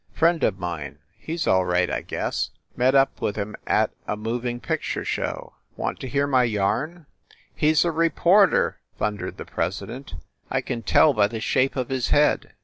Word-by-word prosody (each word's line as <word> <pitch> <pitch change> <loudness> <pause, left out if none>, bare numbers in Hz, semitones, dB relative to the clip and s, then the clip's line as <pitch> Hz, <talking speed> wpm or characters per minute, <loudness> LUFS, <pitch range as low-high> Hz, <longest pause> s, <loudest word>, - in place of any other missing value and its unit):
"Friend 165 0 +3
of 95 - +2
mine. 80 -6 -5 0.2
He 160 - -6
s 170 - -2
all 95 -1 +3
right, 90 0 +1
I - - -2
guess. - - -2 0.3
Met 130 +2 +3
up 135 0 +3
with 105 - -1
him 105 0 -4
at - - +2 0.2
a 105 - -2
mov 115 +3 -3
ing 120 0 -2
picture - - -3
show. - - -3 0.2
Want - - -3
to - - -5
hear 140 +2 +1
my 135 -3 +3
yarn?" 120 - -1 0.5
"He 150 - +2
s 155 +2 +4
a 170 - +1
reporter!" 170 +5 +3 0.2
thundered 105 -2 -3
the - - -7
president. 105 +7 -4 0.3
"I - - 0
can 120 -2 -4
tell 145 +6 +5
by 105 -4 +3
the 110 +1 -5
shape 130 +4 +1
of 130 -3 -2
his 130 -2 -1
head. 150 +1 +2
125 Hz, 190 wpm, -24 LUFS, 105-150 Hz, 0.5 s, tell